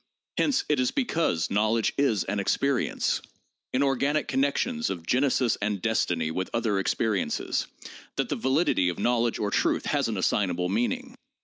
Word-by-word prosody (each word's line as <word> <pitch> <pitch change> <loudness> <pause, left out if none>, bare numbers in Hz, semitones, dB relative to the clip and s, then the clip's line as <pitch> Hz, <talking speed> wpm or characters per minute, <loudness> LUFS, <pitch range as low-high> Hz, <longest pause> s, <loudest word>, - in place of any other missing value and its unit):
Hence 280 -2 +2
it 150 -3 +1
is 125 - +2
because 165 - 0
knowledge 110 +2 +2
is 115 -10 +2
an 100 +4 -2
experience, 135 +6 0 0.5
in 130 - +2
organic 140 +2 +1
connections 140 - 0
of 85 -2 -5
genesis 125 +1 +2
and 105 -1 -1
destiny 90 -6 0
with 95 +3 -3
other 110 -4 +1
experiences, 105 +1 -1 0.5
that - - -1
the - - 0
validity 130 - +2
of 90 - -4
knowledge 120 -1 +1
or 105 -1 -2
truth - - +1
has - - +1
an - - -2
assignable 90 -3 0
meaning. 240 - -1
115 Hz, 150 wpm, -27 LUFS, 100-140 Hz, 0.5 s, Hence